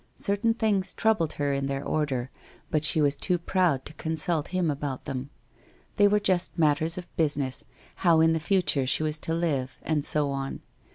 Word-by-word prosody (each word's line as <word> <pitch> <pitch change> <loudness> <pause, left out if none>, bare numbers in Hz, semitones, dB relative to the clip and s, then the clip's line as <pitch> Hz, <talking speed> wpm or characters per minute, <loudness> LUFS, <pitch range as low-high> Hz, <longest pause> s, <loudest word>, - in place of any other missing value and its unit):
Certain 205 +3 +1
things 210 -5 0
troubled 215 -8 +1
her 145 -1 -1
in 140 0 -1
their 135 0 -3
order, 135 -5 -1 0.4
but 155 -1 +1
she 155 - +4
was 145 0 +2
too 180 +4 +1
proud 170 -6 0
to - - -4
consult 160 0 -1
him 180 -4 0
about 140 -2 -5
them. 135 -1 -5 0.7
They 205 - +6
were 210 +1 +3
just 185 -3 0
matters 160 +1 +2
of 180 -1 -9
business, 145 -5 0 0.3
how 170 -3 +4
in 160 0 +4
the 160 - 0
future 155 -6 +1
she 145 - +2
was 155 0 -2
to 165 - -1
live, 140 -7 -2
and 155 -2 0
so 145 -1 +1
on. 135 0 -4
155 Hz, 185 wpm, -27 LUFS, 140-180 Hz, 0.7 s, They